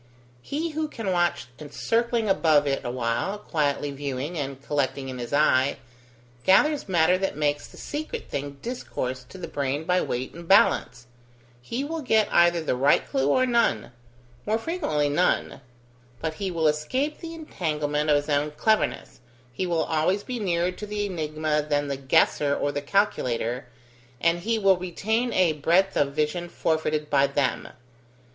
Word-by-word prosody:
He 315 - -3
who 310 0 -2
can 225 -9 -4
watch 175 -1 +1 0.2
circling 230 +7 0
above 155 -6 +3
it 135 -1 -1
awhile, 120 - -2
quietly 145 -6 -1
viewing, 140 +3 -4
and 140 -3 -4
collecting 140 -1 -2
in 130 -1 -6
his 120 -1 -6
eye, 140 -2 +3 0.7
gathers 285 +6 +3
matter 180 +1 +3
that 195 -6 -2
makes 145 -1 0
the - - -16
secret 300 +1 -5
thing 140 0 -5
discourse 130 - -4
to - - -11
the 180 - -6
brain 140 +1 -2
by 180 +2 +2
weight 125 +2 -3
and 170 0 -10
balance; 125 -10 +3 0.6
he 235 - -3
will 320 +2 -4
get 220 -5 +3
either 170 -1 +4
the 145 - 0
right 135 +3 +3
clue 135 0 0
or 255 - +3
none; 235 - +1 0.6
more 215 +1 +2
frequently 225 - -1
none; 145 -1 0 0.6
but 160 -1 -2
he 195 +4 -3
will 165 -3 +1
escape 255 - -1
the 330 -1 -7
entanglement 150 - -2
of 150 - +5
his 145 0 0
own 145 0 +1
cleverness, 215 +9 0 0.3
he 185 +7 -2
will 165 -2 +1
always 165 +6 0
be 250 -2 -4
nearer 175 -3 0
to 210 +3 -8
the 205 0 -2
enigma 155 -4 -1
than 145 -1 -1
the 140 - -1
guesser 140 +2 +2
or 145 - -1
the 145 - -3
calculator, 130 - 0 0.5
and 170 +3 +2
he 225 +5 0
will 195 -3 +4
retain 220 +7 -1
a 180 -3 +3
breadth 170 +6 +2
of 140 -1 +1
vision 165 +3 -1
forfeited 155 -2 -1
by 140 -1 +3
them. 140 -3 -1
160 Hz, 165 wpm, -25 LUFS, 145-200 Hz, 0.7 s, of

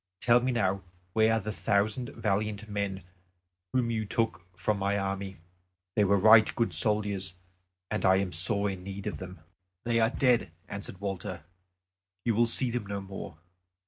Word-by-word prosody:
Tell 120 0 +5
me 130 +1 0
now 100 -5 0 0.3
where 110 +1 +4
are 115 - +2
the 110 +1 -4
thousand 110 +4 0
valiant 105 +1 -1
men 100 -2 -3 0.7
whom 125 -2 +1
you 110 -1 -1
took 110 -4 -2
from 100 +3 0
my 100 +1 0
army. 95 -1 -3 0.6
They 105 - +4
were 100 +1 +4
right 110 +2 +7
good 115 -6 0
soldiers, 100 0 +1 0.6
and 105 - -1
I 95 - +5
am 95 0 0
in - - -12
sore 100 +4 +1
need 95 +1 -8
of - - -4
them." 90 -2 -9 0.4
"They 115 -1 +1
are 110 0 +4
dead," 125 -8 +2 0.2
answered 100 -1 -7
Walter; 95 -6 -4 0.8
"you 115 - +2
will 120 +2 +3
see 120 +1 +4
them 120 -4 -3
no 100 0 -3
more. 95 -5 -8
100 Hz, 170 wpm, -29 LUFS, 95-115 Hz, 0.8 s, right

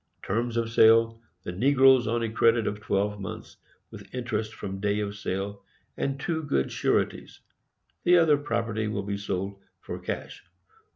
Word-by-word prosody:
Terms 115 +3 -1
of 115 -1 -1
Sale: 115 0 +5 0.2
The - - -4
negroes 130 +4 +5
on 115 +1 0
a 115 - -2
credit 115 0 +3
of 105 - -2
12 105 0 -1
months, 95 -2 -8 0.3
with - - -12
interest 110 -3 -2
from 95 -2 -6
day 100 +1 0
of 100 -1 -3
sale, 100 -1 -4 0.3
and 135 0 -2
two 160 +2 -2
good 70 - -1
sureties. - - -1 0.6
The 180 0 +6
other 160 -4 +5
property 115 -5 -2
will 105 -2 -2
be 100 0 -3
sold 100 0 -3 0.2
for - - -7
cash. - - -6
110 Hz, 160 wpm, -27 LUFS, 100-120 Hz, 0.6 s, The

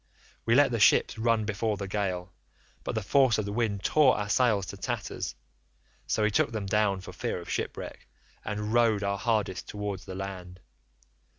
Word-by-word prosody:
We 115 - +4
let 140 -1 +5
the 115 - -1
ships 110 - +4
run 115 -1 +2
before 105 0 -1
the 100 0 -4
gale, 95 -3 -2 0.5
but - - -3
the 110 - -1
force 130 +2 +4
of 110 - -1
the 100 - -4
wind 105 -4 -1
tore 150 -4 +4
our 105 -1 -3
sails 110 -5 +3
to - - -8
tatters, - - -4 0.7
so 110 - +1
we 105 - +3
took 115 - +2
them 110 -3 -3
down 100 -1 +1
for - - -10
fear - - -3
of - - -8
shipwreck, - - -4 0.4
and 105 +1 -3
rowed 115 -3 +3
our 100 0 -1
hardest 105 -6 -1
towards 105 -2 -5
the 95 - -7
land. 95 -2 -7
105 Hz, 185 wpm, -28 LUFS, 100-115 Hz, 0.7 s, let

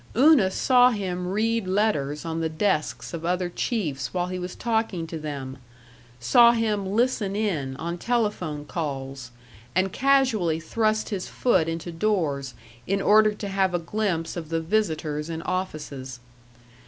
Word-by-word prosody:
Una 270 -7 +6
saw 250 +5 +5
him 185 -5 -3
read 220 +2 0
letters 175 -8 0
on 165 0 -3
the 160 - 0
desks 160 0 -1
of 165 -1 -5
other 180 +1 0
chiefs 175 - -2
while 180 -1 -1
he 185 0 -4
was 180 0 -5
talking 220 -7 -1
to 165 0 -6
them; 140 -3 -6 0.6
saw 235 - +6
him 215 -4 0
"listen 220 -3 +1
in" 160 -11 -1
on 170 +4 -4
telephone 205 -11 -1
calls, 135 -5 -5 0.5
and 185 0 +1
casually 250 -12 +2
thrust 215 +6 0
his 195 -4 -3
foot 170 -10 +1
into 165 +1 -4
doors, 160 - -1 0.3
in 195 +1 +1
order 215 +2 +5
to 210 0 -6
have 190 -2 +1
a - - +3
glimpse 170 -2 -2
of 165 -3 -6
the 165 0 0
visitors 160 -4 -1
in 165 0 -4
offices. 150 -8 -4
180 Hz, 150 wpm, -25 LUFS, 155-215 Hz, 0.6 s, Una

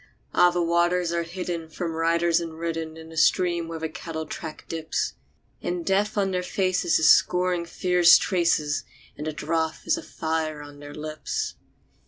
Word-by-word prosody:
Ah! 180 - +6
the 175 0 0
waters 170 +1 +2
are 170 - +1
hidden 170 -1 -5
from 165 +1 -4
riders 165 +1 +2
and 165 -1 -6
ridden 165 -1 -4
In 160 0 -11
a 160 - -10
stream 170 +1 +3
where 165 0 -5
the 160 0 -3
cattle 160 0 -6
track 160 -1 -7
dips; 160 -1 -2 0.5
And 175 -1 -3
Death 205 +2 +1
on 195 -1 +1
their 180 -1 0
faces 185 -1 +1
is 155 - +3
scoring 180 -1 +3
fierce 180 0 +5
traces, 165 -5 +1 0.3
And 150 - -6
the - - -1
drouth 160 +1 -2
is 325 0 +2
a - - -5
fire 160 - -3
on 145 0 -12
their 145 0 -10
lips. 155 0 -4
165 Hz, 175 wpm, -25 LUFS, 160-180 Hz, 0.5 s, Ah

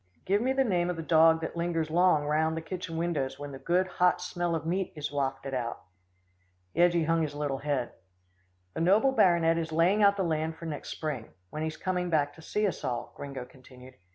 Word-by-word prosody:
Give 200 +3 +2
me 255 +2 +1
the 270 0 +2
name 180 -7 +1
of 180 - -1
the 165 - -5
dog 160 0 +5
that 160 - -4
lingers 165 -2 -1
long 170 -3 +3
round 160 +2 +1
the - - -3
kitchen 175 0 -5
windows, 160 -6 -1
when 145 0 -7
the 135 - -8
good, 180 +4 +1
hot 180 -1 +2
smell 175 -1 -2
of 160 -1 -4
meat 185 +3 -1
is 150 -1 -4
wafted 135 -1 -2
out." 120 -2 -3 0.9
Yeggie 170 -1 +3
hung 165 +1 +2
his 150 -2 -2
little 145 -2 -2
head. 140 -4 -1 0.8
"The - - -3
noble 205 +10 +4
baronet 170 -8 +4
is 165 -1 -4
laying 175 +6 +3
out 200 0 +5
the 195 - +1
land 160 -1 -1
for 165 - -10
next 150 -3 -5
spring, 145 -8 -4 0.2
when 155 - -5
he's 160 0 -3
coming 180 -1 -2
back 145 -3 +1
to 160 - -14
see 210 +6 -1
us 185 -7 -2
all," 120 -1 -3
Gringo 135 -3 -6
continued. 130 0 -15
160 Hz, 210 wpm, -29 LUFS, 145-175 Hz, 0.9 s, dog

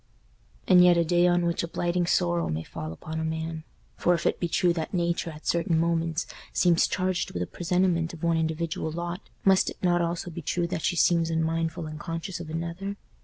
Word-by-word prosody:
And 180 -1 +7
yet 175 -1 +6
a 170 - +3
day 175 +1 +4
on 175 0 +2
which 170 0 0
a 170 - -3
blighting 175 +1 -1
sorrow 175 -1 +1
may 80 +1 -2
fall 80 0 -6
upon 155 - -6
a - - -2
man. 160 0 -3 0.3
For 175 - +3
if 170 - -4
it - - +1
be 175 - 0
true 175 +1 +2
that 165 +3 -3
Nature 170 -1 0
at 155 -1 -11
certain 170 -1 +1
moments 165 0 0 0.3
seems 175 -2 +3
charged 185 0 -1
with 90 - 0
a - - -3
presentiment 175 - 0
of 165 -1 -11
one 170 0 +2
individual 160 0 -1
lot 170 +3 -5 0.2
must 190 -1 +5
it - - -9
not 175 -1 +3
also 170 +1 -2
be 170 - -6
true 175 +3 -1
that 170 -1 -3
she 175 - 0
seems 170 -1 +3
unmindful, 165 +1 -1
unconscious 165 +4 -5
of 170 -2 -7
another? 170 +5 -4
170 Hz, 210 wpm, -27 LUFS, 160-175 Hz, 0.3 s, And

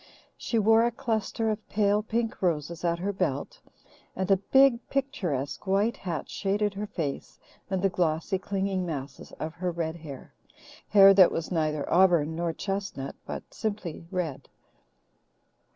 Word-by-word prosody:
She 230 - -2
wore 225 +1 +5
a 235 - +3
cluster 225 -2 -1
of 215 0 -6
pale 205 0 +2
pink 225 +1 -2
roses 170 -2 -1
at 170 -1 +1
her 195 +4 -2
belt, - - -2 0.5
and 190 +1 -1
a 195 - +6
big, 265 +5 +4
picturesque 190 - -2
white 205 +5 +2
hat 170 -5 -4
shaded 205 +1 -1
her 205 +1 -4
face 160 -9 -4 0.3
and 190 -1 -1
the 195 - +4
glossy, 175 +2 0
clinging 195 -1 -1
masses 140 -5 -6
of 155 0 -5
her 180 +1 -2
red 165 -1 -3
hair 145 -5 -10 0.5
hair 195 -1 +8
that 190 -2 +7
was 165 +1 -3
neither 155 -4 0
auburn 170 -4 +4
nor 170 0 -1
chestnut 195 -6 -4
but - - -7
simply 200 -6 -4
red. 170 -7 -4
190 Hz, 150 wpm, -27 LUFS, 165-210 Hz, 0.5 s, hair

